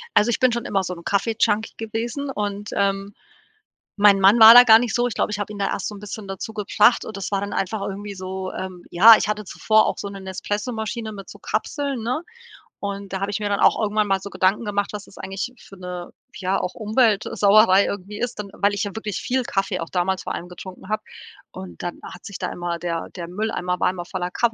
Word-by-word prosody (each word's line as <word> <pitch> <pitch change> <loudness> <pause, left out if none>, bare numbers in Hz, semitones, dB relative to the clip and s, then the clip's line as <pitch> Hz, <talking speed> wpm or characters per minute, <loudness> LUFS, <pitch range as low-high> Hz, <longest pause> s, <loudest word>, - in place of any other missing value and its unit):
Also, 215 +3 +4
ich - - 0
bin 255 -1 +4
schon 235 0 -3
immer 195 -2 0
so 180 - -4
'n 170 -1 -11
Kaffee-Junkie 220 +1 0
gewesen 235 +5 -4
und, 205 -3 -4
ähm, 195 0 0 0.8
mein 205 -1 +6
Mann 200 +5 +6
war 225 +1 +11
da 245 0 +11
gar 220 -2 +8
nicht 240 -2 -2
so. 245 0 +2
Ich 240 - -4
glaube, - - -1
ich 205 - -2
hab 205 - -3
ihn 210 - -8
da 195 - +1
erst - - -2
so 210 - -6
'n - - -10
bisschen 210 0 -8
dazu 195 +3 -6
gebracht 210 +3 +3
und 215 - -7
das 195 +1 -5
war 195 - +1
dann 200 - -4
einfach 195 +2 -2
irgendwie 200 +1 -5
so, 185 0 -5
ähm 185 -2 -7
ja, 220 +6 +9
ich - - -2
hatte 210 0 -2
zuvor 220 +3 +2
auch - - -1
so 200 - -5
'ne 200 -1 -8
Nespresso-Maschine 220 +4 -4
mit 195 -1 -10
so - - -12
Kapseln, 280 -5 -3
ne, 250 +7 -1 0.6
und 200 -1 -5
da 190 - -2
habe 200 +1 -2
ich 205 - -2
mir 205 -1 -2
dann 200 - 0
auch - - +4
irgendwann 210 0 +1
mal 195 0 +1
so 200 - -7
Gedanken 195 +5 +1
gemacht, 205 -1 -1
was 205 -1 -6
das - - -18
eigentlich 195 +5 -5
für 195 - -15
'ne, 180 -1 -7 0.3
ja, 190 0 0
auch 180 - -3
Umweltsauerei 215 -3 +4
irgendwie 200 +1 -5
ist, 245 -3 -3
dann 200 -1 -5
weil 200 0 +1
ich 200 - -1
ja 205 +1 -5
wirklich 210 -2 -4
viel 255 0 -1
Kaffee 195 -4 -2
auch 165 - -5
damals 185 +1 0
vor - - -4
allem 175 - -6
getrunken 185 +2 -11
hab 215 - -1 0.5
und 90 -3 -10
dann 175 - -5
hat - - -11
sich 200 - -7
da - - -3
immer 175 -1 -4
der 170 -2 -3
der 170 -2 -6
Mülleimer 180 -2 -2
war - - +3
immer 175 -2 -7
voller 180 -1 -4
Kaf 235 +4 +1
205 Hz, 240 wpm, -22 LUFS, 190-220 Hz, 0.8 s, war